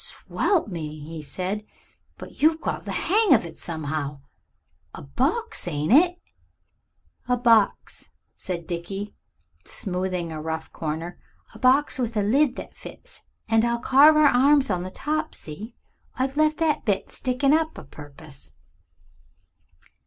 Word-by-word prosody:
"Swelp 385 - -1
me!" 155 -5 -6
he 155 +2 -8
said; 185 +7 -4 0.5
"but - - -11
you've 315 +1 +4
got - - -4
the - - -4
hang 415 -5 +3
of 215 - 0
it 165 -1 -9
somehow. 150 -3 -4 0.8
A - - -9
box, 70 0 -1
ain't 150 +7 0
it?" 355 +5 +5 1.1
"A 250 0 +2
box," 230 -4 +2 0.3
said 175 -3 -5
Dickie, 195 +5 -5 0.5
smoothing 180 -2 -3
a 155 -1 -5
rough 160 0 -5
corner; 165 +3 -5 0.3
"a - - -13
box 265 +2 +3
with 235 -3 -2
a 205 - +2
lid 260 +5 +2
that - - -8
fits. - - -12 0.3
And 225 0 +3
I'll 235 0 +1
carve 280 +6 +6
our 305 0 +5
arms 275 -1 +4
on 180 -1 0
the 185 - -5
top 310 +9 -3
see, 210 +10 -8 0.4
I've 260 +2 -2
left 310 0 +2
that 320 -2 +1
bit 200 -4 -1
stickin' 265 +2 +1
up 320 0 +1
a - - -8
purpose." 145 -1 -12
215 Hz, 145 wpm, -24 LUFS, -, 1.1 s, carve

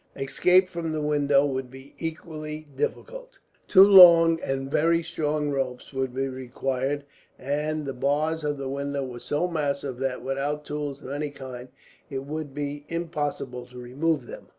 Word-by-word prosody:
Escape 180 +7 +3
from 170 -3 -4
the 155 - -2
window 145 -1 +3
would 130 -2 -3
be 130 +2 -13
equally 155 -1 -6
difficult. - - -4 0.3
Two 190 -1 +8
long 170 -4 +8
and 135 0 -3
very 165 +3 +2
strong 150 -2 -1
ropes 135 -1 -3
would 130 -1 -1
be 135 +2 -2
required, 130 +2 -3 0.3
and 150 +3 -2
the 135 - -3
bars 150 +5 0
of 145 -1 -1
the 135 -1 -4
window 140 0 -3
were 125 -2 -7
so 145 +8 -1
massive 140 -5 -2
that, 130 -2 -2
without 140 +3 -2
tools 145 -1 -5
of 130 - -7
any 145 +1 -2
kind, 130 -3 -9 0.4
it 135 -2 -5
would 155 0 -5
be 145 +1 -4
impossible 145 -7 -3
to 125 0 -14
remove 135 +3 -1
them. - - -10
145 Hz, 160 wpm, -26 LUFS, 135-155 Hz, 0.4 s, Two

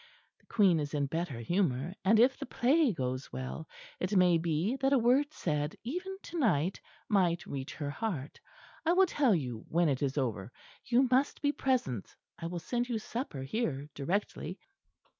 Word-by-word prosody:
The - - -31
Queen 195 -7 +4
is 145 0 -3
in 145 -1 +1
better 160 -2 -3
humour, 160 - 0
and 215 +3 +5
if 255 +3 +5
the - - -7
play 275 +3 +3
goes 130 -5 -3
well, 130 +4 -5 0.3
it 185 +3 -1
may 180 -2 +5
be 170 +8 0
that 270 +1 +2
a - - +6
word 260 +5 +3
said 150 - -2
even 365 - -4
to 340 - -5
night 180 - +1 0.3
might 180 -5 +2
reach 135 -1 -5
her 145 -2 -3
heart. 155 - -4 0.4
I 335 - +3
will 380 +1 +6
tell 280 - +3
you 125 -8 -3
when 170 0 +3
it 135 -2 0
is 140 0 -1
over. 115 -6 -2 0.3
You 250 +2 +4
must 265 +3 +2
be 285 - +4
present. 245 - -1 0.2
I 165 - -4
will 175 +1 -4
send 240 +8 -2
you 235 - 0
supper 215 - -4
here 145 - -2
directly." 180 +2 -2
180 Hz, 180 wpm, -31 LUFS, -, 0.4 s, a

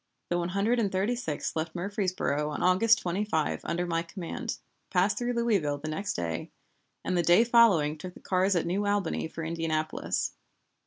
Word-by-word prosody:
The 175 - +2
One 175 0 -2
Hundred 205 +6 +1
and 205 -4 +1
Thirty 195 +6 +1
sixth 160 -12 -3
left 160 +1 -3
Murfreesboro 180 -6 -1
on 150 - -3
August 205 +5 +5
25 175 -3 -1
under 175 +1 -1
my 165 -1 0
command, 195 +7 -5 0.3
passed 195 +3 +2
through 245 0 -1
Louisville 205 -12 +1
the 155 +2 -6
next 195 +6 -2
day, 85 -1 -3 0.6
and 185 - 0
the 175 - +3
day 175 +6 +5
following 200 -11 +4
took 180 +2 -8
the - - -12
cars 190 +1 +1
at 170 - +1
New 195 +4 0
Albany 205 -6 0
for 165 +1 -7
Indianapolis. 160 -1 -1
180 Hz, 175 wpm, -28 LUFS, 160-205 Hz, 0.6 s, August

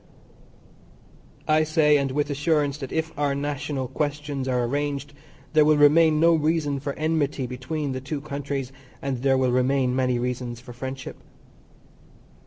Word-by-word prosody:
I 155 0 +4
say, 155 -1 +3
and 140 -1 0
with 145 +2 -1
assurance, 150 -1 0
that 135 -3 -6
if 160 0 -1
our 145 -1 +1
national 145 -1 -3
questions 145 0 -3
are 125 -1 +1
arranged 145 +3 -2 0.4
there 155 -1 +6
will 150 0 +4
remain 155 +1 +5
no 170 +1 +5
reason 155 -2 +1
for 140 +1 -4
enmity 155 -3 -1
between 135 +4 -4
the 130 0 -4
two 140 +2 -4
countries, 140 -2 -4 0.3
and 135 -3 -3
there 135 0 +3
will 130 -1 +2
remain 130 0 +2
many 130 -1 +1
reasons 125 -1 -3
for 125 0 -11
friendship. 130 +2 -6
140 Hz, 150 wpm, -25 LUFS, 130-150 Hz, 0.4 s, there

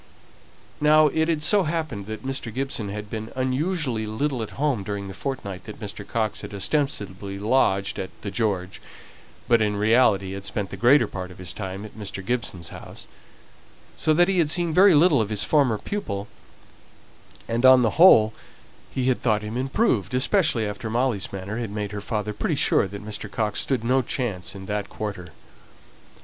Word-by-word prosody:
Now 150 0 +5
it 160 +2 0
had 160 -3 0
so 205 +5 +4
happened 155 - -3
that 110 +4 -7
Mr. 135 -3 -3
Gibson 125 -4 -3
had 105 +1 -6
been 110 +1 -6
unusually 130 - -1
little 125 +4 -2
at 110 - -4
home 140 -6 0
during 100 0 -5
the 95 - -7
fortnight 100 -6 -5
that 105 -1 -9
Mr. 100 -2 -6
Coxe 110 -3 -2
had 105 - -8
ostensibly 100 -5 -2
lodged 100 -3 +1
at 95 -1 -4
the 100 - -4
"George," 100 -5 -2 0.7
but 115 -1 +4
in 105 -1 +1
reality 105 -3 +3
had 100 0 -6
spent 100 0 -4
the - - -5
greater 125 +2 +5
part 95 -2 -6
of 90 - -13
his 90 -1 -5
time 95 0 -6
at 105 - -12
Mr. 100 -3 -6
Gibson's 105 -7 -2
house - - -11 0.9
so 155 - +1
that 175 +2 +5
he 195 -2 +1
had 160 -3 +2
seen 170 0 +2
very 190 0 +6
little 150 -4 +5
of 105 - -2
his 105 -1 +1
former 135 -8 +2
pupil, 105 - -4 1.2
and 115 +2 -1
on 130 -1 +8
the 115 - +2
whole 110 -12 +8 0.6
he 130 - -2
had 130 - +1
thought 110 -3 +1
him 105 +2 -5
improved, 130 - 0
especially 130 - +2
after 105 +2 -5
Molly's 115 -4 0
manner 100 +4 -5
had 115 -3 -3
made 105 -1 -4
her 105 -1 -5
father 105 0 -3
pretty - - -1
sure - - +3
that 100 +2 -9
Mr. 105 -1 -5
Coxe 105 0 -1
stood 130 -5 -1
no 130 +3 +3
chance 110 -8 -3
in 95 -1 -8
that 105 0 -3
quarter. 100 -5 -5
110 Hz, 185 wpm, -24 LUFS, 100-135 Hz, 1.2 s, on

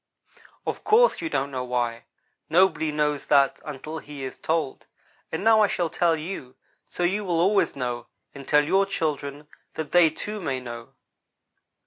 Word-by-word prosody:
"Of - - -3
course 470 +3 +4
you 330 - -2
don't 140 - -1
know 130 -1 -3
why. 120 -1 -2 0.4
Nobody 160 -2 +3
knows 150 -1 -1
that 140 -2 +4
until 155 +2 -6
he 145 -2 -9
is 130 - -6
told, 160 -4 -2 0.4
and 160 - -3
now 220 0 +6
I 210 - +5
shall 170 -4 -1
tell 170 -1 +2
you, 155 -6 -7 0.3
so 175 - -4
you 195 +4 +1
will 175 -4 0
always 195 +4 +3
know, 120 -3 -3 0.3
and 140 -1 -10
tell 150 0 +5
your 195 +5 +3
children, 150 -4 -3 0.3
that 155 -2 -5
they, 175 -2 +6
too, 210 +7 -6
may 135 -6 -2
know. 120 -2 -9
155 Hz, 165 wpm, -25 LUFS, 135-175 Hz, 0.4 s, now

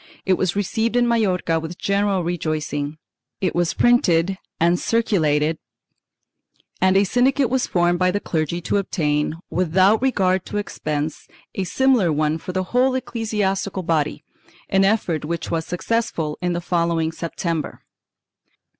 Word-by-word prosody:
It 190 - +3
was 185 0 0
received 220 +4 -1
in 245 0 +3
Majorca 185 -8 +1
with 165 +2 -7
general 200 -2 +1
rejoicing; 155 -3 -2 0.4
it 185 - 0
w^as 175 -1 0
printed 190 -6 +3 0.2
and 170 +1 +3
circulated 160 -9 +1 1.2
and 190 +1 +4
a 195 - +5
syndicate 250 +4 +2
was 260 -1 +1
formed 175 0 +1
by 185 0 +3
the 200 +3 0
clergy 165 -1 -2
to 190 - 0
obtain, 150 -6 0 0.2
without 185 +5 +3
regard 190 -8 +1
to - - -4
expense, 155 -6 -3 0.3
a 190 - -2
similar 245 -4 +2
one 155 +1 0
for 180 - -6
the 185 0 -1
whole 255 +1 +3
ecclesi 225 -4 -3
astical 190 -1 -1
body, 155 -2 0 0.5
an 195 0 +3
effort 195 -7 +1
which 165 +2 -4
was 160 -1 -1
successful 180 -5 -1
in 180 -1 0
the 175 - -2
following 170 -2 0
September. 165 -1 -4
180 Hz, 145 wpm, -22 LUFS, 165-205 Hz, 1.2 s, a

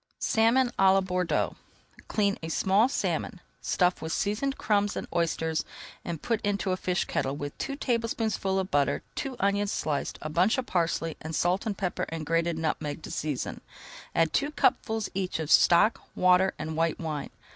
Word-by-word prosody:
SALMON 235 +3 +3
À 190 0 +6
LA 195 - +4
BORDEAUX 180 -2 0 0.5
Clean 200 -2 +1
a 160 - -5
small 195 +8 +3
salmon, - - -2 0.2
stuff 180 -1 +1
with 160 - -4
seasoned 210 - -1
crumbs 205 -2 +1
and - - -3
oysters, 160 -2 0 0.4
and 170 -3 -5
put 230 -2 0
into 200 -2 0
a - - +2
fish 180 -1 -1
kettle 135 +1 -1
with 145 0 -5
two 275 - -3
tablespoonfuls 225 -6 0
of 190 - -7
butter, 140 -1 +1
two 270 -3 -4
onions 200 +1 +1
sliced, 145 -2 -2
a - - -2
bunch 185 - +3
of 260 - -1
parsley, 165 -3 -1
and 160 0 -5
salt, 185 +5 +1
pepper, 185 -3 -2
and 160 -1 -5
grated 165 +1 +1
nutmeg 155 -1 -2
to - - -7
season. 150 -4 -3 0.5
Add 165 -1 +2
two 290 - +1
cupfuls 220 -7 +1
each 190 -1 -2
of 160 -1 -3
stock, 180 +6 +5
water, 185 +1 +4
and 155 +1 -4
white 165 0 +1
wine. 155 -4 -4
185 Hz, 170 wpm, -28 LUFS, 160-210 Hz, 0.5 s, À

